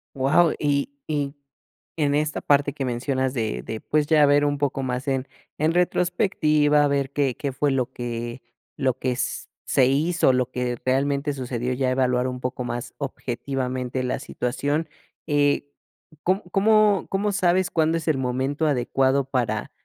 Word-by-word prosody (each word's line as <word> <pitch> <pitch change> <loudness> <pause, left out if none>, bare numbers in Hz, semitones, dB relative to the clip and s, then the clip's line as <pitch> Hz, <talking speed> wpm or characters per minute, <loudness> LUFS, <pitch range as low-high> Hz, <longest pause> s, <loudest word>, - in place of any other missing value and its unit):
Guau. 140 +6 +3
Y 140 -1 +1 0.2
y 145 -2 -1 0.6
en 145 -3 +1
esta 150 0 0
parte 145 0 +3
que 140 -3 -3
mencionas 130 +2 -1
de 110 - -2
de, 110 - -6
pues, 150 -1 +1
ya 150 -1 +5
ver 145 +1 +4
un 145 0 0
poco 135 -1 -1
más 125 +1 -3
en 135 -1 -1 0.3
en 155 +2 +1
retrospectiva, 155 -5 +2
ver 140 -1 0
qué 135 -3 0
qué 140 - -3
fue 140 +2 0
lo 130 -2 0
que 120 +1 -5 0.4
lo 135 -3 +1
que 130 -1 -1
s 125 +1 -3 0.2
se 130 - +3
hizo, 145 +1 +2
lo 125 0 +1
que 125 -1 -2
realmente 140 +2 +1
sucedió, 125 -1 -3
ya 130 0 0
evaluar 125 -1 +1
un 125 0 -4
poco 125 0 -3
más 120 0 -5
objetivamente 130 -1 -3
la 125 - -1
situación, 145 +6 -2 0.4
eh, 145 -1 +1 0.5
¿cómo 190 +3 +1
cómo 210 0 +4
cómo 200 +2 0
sabes 185 -1 +2
cuándo 160 0 +1
es 165 - -6
el 155 -4 +2
momento 130 +4 -1
adecuado 135 0 +1
para 120 -5 -2
140 Hz, 160 wpm, -24 LUFS, 125-150 Hz, 0.6 s, ya